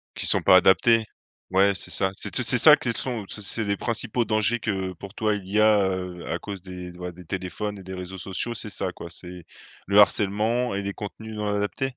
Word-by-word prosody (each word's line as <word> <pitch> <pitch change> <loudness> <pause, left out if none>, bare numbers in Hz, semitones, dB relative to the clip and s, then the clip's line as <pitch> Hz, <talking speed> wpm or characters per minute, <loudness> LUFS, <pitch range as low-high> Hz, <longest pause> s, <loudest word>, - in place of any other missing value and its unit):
Qui - - -1
sont - - +3
pas 95 - +7
adaptés. 110 +4 +4 0.5
Ouais 100 +1 +4
c'est - - -5
ça. 95 -1 +1
C'est - - -4
tout - - +2
c'est - - +4
ça - - +9
qu'ils 115 - -2
sont 120 -6 -1
c'est 105 - -5
c'est 110 +2 0
les 100 0 0
principaux 120 0 -1
dangers 110 +2 +1
que 95 -3 -2
pour 100 +3 -11
toi 110 -1 0
il 100 -2 -7
y 105 +2 0
a, 105 -3 +4
heu, 90 -2 -5
à 85 - -1
cause 100 -3 -7
des, 90 -1 -9
ouais, 90 0 -6
des 90 0 -14
téléphones 95 +3 -4
et 95 - -11
des 95 +1 -8
réseaux 90 +1 -7
sociaux, 95 +6 -2
c'est 110 - -4
ça 95 -2 -2
quoi. 85 - -9
C'est 90 -1 -10 0.4
le 100 +1 +4
harcèlement 105 +4 +2
et 100 - -2
les 100 0 -4
contenus 110 +1 -8
non 105 0 -3
adaptés? 105 +6 -2
100 Hz, 230 wpm, -24 LUFS, 95-110 Hz, 0.5 s, ça